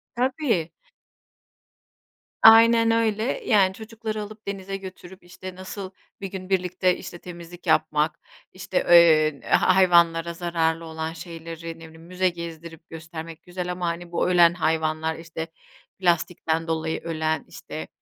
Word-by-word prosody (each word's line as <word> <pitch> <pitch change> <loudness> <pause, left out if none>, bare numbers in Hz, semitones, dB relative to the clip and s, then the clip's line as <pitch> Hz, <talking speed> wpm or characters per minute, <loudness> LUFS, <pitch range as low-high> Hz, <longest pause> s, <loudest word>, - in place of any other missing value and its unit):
Tabii. 245 - 0 1.7
Aynen 230 +1 +7
öyle, 220 -1 +1 0.2
yani 195 -4 +4
çocukları 220 0 -6
alıp 210 0 -10
denize 195 0 -4
götürüp, 190 -1 -11
işte, 185 +1 -10
nasıl 185 +1 -7 0.3
bir 195 - -3
gün 185 -1 -7
birlikte, 185 -1 +1
işte, 175 - -9
temizlik 175 0 -11
yapmak, 155 0 +2 0.3
işte, 185 0 -4
eee, 155 -4 +6
ha 185 - +4
hayvanlara 170 -2 +4
zararlı 165 -1 -1
olan 160 0 -5
şeyleri, 165 0 -8
ne - - -12
bileyim, 160 0 -15
müze 185 +1 +1
gezdirip 165 -1 -9
göstermek 160 0 -9
güzel 180 0 -5
ama 180 -1 -3
hani 170 +1 -4
bu 170 - 0
ölen 175 -1 +6
hayvanlar, 160 -1 0
işte 165 0 -7 0.5
plastikten 165 -2 0
dolayı 160 0 -2
ölen, 160 -1 -2
işte - - -8
175 Hz, 130 wpm, -24 LUFS, 165-190 Hz, 1.7 s, Aynen